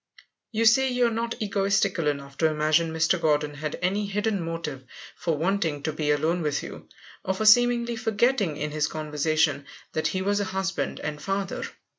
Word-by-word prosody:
You 225 0 0
say 265 +4 +5
you 250 -1 +2
are 235 - +2
not 230 +1 -3
egotistical 195 -4 +1
enough 140 -1 -3
to 160 - +4
imagine 155 +1 +2
Mr. 160 +2 +1
Gordon 150 -2 +1
had 150 +1 -4
any 200 +3 0
hidden 205 0 -1
motive 165 -5 -5 0.3
for 165 -3 -1
wanting 165 -4 0
to 155 - -1
be 150 -1 -2
alone 160 +4 +1
with 150 -2 -1
you, - - -10 0.3
or 190 - -1
for 215 - -2
seemingly 235 +1 +5
forgetting 225 - +1
in 150 0 -3
his 150 0 0
conversation 155 -1 0 0.3
that 155 - 0
he 185 0 -2
was 205 +1 +1
a 205 - 0
husband 190 0 -2
and 150 0 -4
father. 195 +3 -2
170 Hz, 180 wpm, -26 LUFS, 150-205 Hz, 0.3 s, say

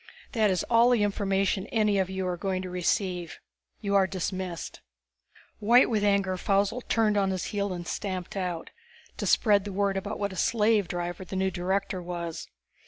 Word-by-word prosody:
That 220 -4 +2
is 185 -2 +1
all 235 +1 +4
the 240 -4 +3
information 195 -1 0
any 210 -3 +2
of 190 -1 0
you 190 0 -3
are 180 -1 -1
going 185 +1 -2
to 185 - -6
receive. 180 -1 -1 0.4
You 200 -2 -1
are 195 -1 +4
dismissed." 185 -2 -4 0.8
White 235 +4 +5
with 215 -2 +1
anger, 200 -2 +2
Faussel 200 +6 +1
turned 215 -2 +2
on 195 -1 +2
his 185 -1 -2
heel 200 -1 -1
and 175 -1 -5
stamped 185 -3 -4
out 180 -4 -3 0.5
to - - -2
spread 205 -3 +4
the 205 - -5
word 195 0 0
about 200 +2 -4
what 200 -1 -2
a - - -8
slave 210 0 +2
driver 175 +1 -4
the 190 - -7
new 190 0 +1
director 190 +1 -1
was. 170 -2 -5
195 Hz, 180 wpm, -27 LUFS, 185-205 Hz, 0.8 s, White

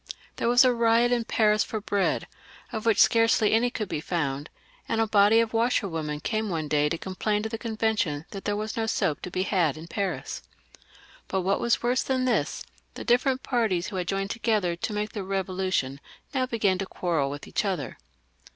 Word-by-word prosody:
There - - 0
was 245 +2 +6
a 250 - +4
riot 235 +1 +3
in 240 -2 +1
Paris 215 -2 +3
for 220 - -4
bread, 200 -1 0 0.5
of 225 -1 -4
which 225 - +4
scarcely 225 -2 +4
any 235 +2 +3
could 215 -3 -4
be 150 - -3
found; 150 -4 -2 0.4
and 225 - 0
a 225 - +3
body 210 +1 +5
of 230 -1 0
washerwomen 170 -11 0
came 220 +4 -1
one 160 -4 -2
day 150 0 +2
to 165 - -2
complain 205 +4 -2
to 220 - -2
the 225 0 -5
Convention 220 -10 -1
tiiat 195 - -7
there 205 - 0
was 215 +1 -3
no 225 -1 -1
soap 155 -8 0
to - - -5
be 185 +1 -1
had 175 -7 +1
in 160 - -8
Paris. 190 +2 -3 0.9
But 190 - -1
what 195 +2 +1
was 235 0 +1
worse 245 +2 +2
than 260 -1 0
this, 250 - 0 0.3
the - - -6
different 255 +2 +2
parties 220 -9 0
who 195 - -5
had 180 -1 -2
joined 195 +1 -1
together 215 -7 0
to 170 - -4
make 210 0 -2
the 205 - -4
Revolution 185 -7 -1 0.3
now 260 -2 +1
began 205 -6 +1
to 195 - -3
quarrel 165 -8 -1
with 145 +1 -7
each - - -1
other. 185 -9 -3
205 Hz, 200 wpm, -26 LUFS, 180-230 Hz, 0.9 s, was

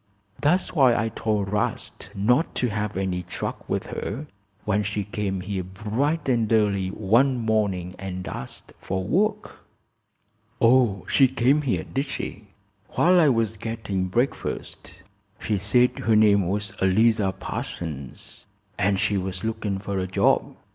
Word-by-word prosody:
"That's 175 +6 +2
why 130 -7 +5
I 115 +1 0
told 105 -3 -1
'Rast 105 - -3
not 125 - +2
to 125 - +1
have 105 -1 -3
any 95 -2 -1
truck 90 - -6
with - - -1
her, 130 +9 -5 0.4
when 105 0 +1
she 105 0 -2
came 100 -2 -3
here 95 0 -3
bright 110 - -2
and 115 -4 +1
early 100 -4 +2
one 115 +7 +2
morning 105 -6 0
and 95 -1 -5
asked 65 - -8
for 95 0 -3
work." 210 - 0 1.0
"Oh, 115 -5 +3
she 135 - +5
came 130 +3 +2
here, 110 - -1
did 140 +1 -3
she?" 105 -5 -6 0.5
"While 180 +1 +4
I 155 -4 +5
was 115 -3 0
gettin' 105 -4 -3
breakfast. 95 -4 -3 0.4
She 105 -3 -1
said 120 +6 +2
her 110 +2 +2
name 100 -3 +4
was 100 +1 -2
Eliza 105 +1 +3
Parsons, 75 -9 -7 0.3
an' 100 +1 +2
she 100 +1 +1
was 95 0 -4
looking 110 -3 -2
fer 100 0 -3
a 95 - -2
job. 95 - +1
105 Hz, 145 wpm, -24 LUFS, 95-120 Hz, 1.0 s, why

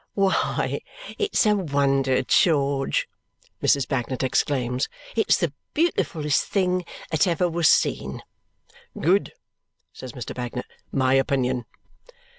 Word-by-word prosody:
"Why, 195 -1 0 0.4
it's 420 - +2
a 210 -1 +4
wonder, 140 -7 +1
George!" 140 - +2 0.5
Mrs. 140 -2 +3
Bagnet 130 0 -2
exclaims. 130 -1 0 0.3
"It's 225 - +3
the 170 -7 -1 0.2
beautifullest 165 - +1
thing 185 -2 0 0.3
that 160 +4 +3
ever 175 +1 +1
was 170 -1 +2
seen!" - - +1 0.8
"Good!" 190 +5 +2 0.6
says 130 -3 -9
Mr. 125 - -6
Bagnet. 125 0 -5 0.3
"My 130 -1 +2
opinion." 130 -2 +1
140 Hz, 105 wpm, -24 LUFS, 130-180 Hz, 0.8 s, a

